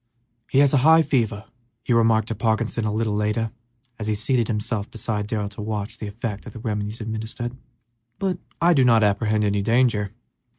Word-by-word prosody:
"He - - 0
has 140 0 +5
a - - +5
high 160 +3 +6
fever," 110 -8 0 0.4
he 120 - +1
remarked 115 -1 +3
to - - -1
Parkinson 110 +1 0
a 105 - 0
little 110 0 0
later, 105 +2 0 0.5
as 105 - -4
he 110 - +1
seated 115 +2 +1
himself 105 -1 -2
beside 105 -2 -3
Darrell 105 -2 -2
to 105 - -9
watch 105 +2 -4
the 105 - -5
effect 105 +1 -5
of 110 - -9
the - - -8
remedies 105 0 -3
administered, 110 +2 -4 0.6
"but 185 -3 -1 0.2
I 175 +1 +5
do 135 -5 +4
not 115 -3 +5
apprehend 105 +1 +2
any 100 -1 +1
danger. 115 -2 +2
110 Hz, 185 wpm, -23 LUFS, 105-120 Hz, 0.6 s, high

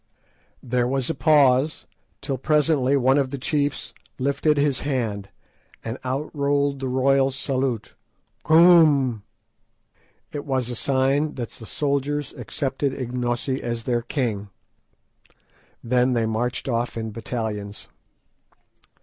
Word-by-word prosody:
There 125 0 0
was 135 +2 0
a - - -2
pause, 145 -1 +3 0.4
till 135 -2 -3
presently 145 -2 +2
one 135 +2 +3
of 135 -2 0
the 140 - -5
chiefs 145 +2 -2 0.2
lifted 140 +3 +1
his 140 -3 +1
hand, 115 -8 -2 0.5
and 115 +2 -5
out 130 +4 -3
rolled 140 -1 +1
the 135 - -3
royal 135 +1 +3
salute, 130 -4 -2 0.5
"Koom." 155 - +5 1.1
It 145 -1 -5
was 130 -3 -1
a - - -4
sign 135 +4 +1
that 120 -3 -4
the 115 -4 -12
soldiers 145 0 -2
accepted 135 -1 -3
Ignosi 125 +1 -2
as 120 -1 -3
their 120 -1 0
king. 115 -6 -3 1.3
Then 125 +1 +2
they 115 -2 +1
marched 120 +4 -2
off 120 -2 -1
in 110 -1 -4
battalions. 105 -2 -5
130 Hz, 120 wpm, -23 LUFS, 120-140 Hz, 1.3 s, Koom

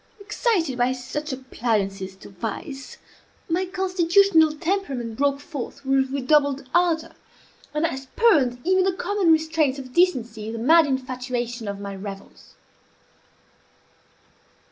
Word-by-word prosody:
Excited 400 - -1
by 245 +1 +2
such 270 +4 -5
appliances 210 -7 -2
to - - -13
vice, 235 - -6 0.5
my 360 +3 0
constitutional 365 -2 +3
temperament 300 - -2
broke 280 +2 +1
forth 285 -2 -7
with 270 0 +2
redoubled 280 0 +1
ardor, 330 -2 +2 0.6
and 300 +2 0
I 330 - -1
spurned 270 - +2
even 375 +1 +3
the 380 0 +1
common 375 -1 +1
restraints 315 -3 +2
of 255 -2 -9
decency 240 -12 +1
in 225 - -4
the - - -4
mad 315 +7 +5
infatuation 250 -3 -3
of 200 0 -4
my 200 -1 -6
revels. 195 0 -10
275 Hz, 120 wpm, -24 LUFS, 245-335 Hz, 0.6 s, mad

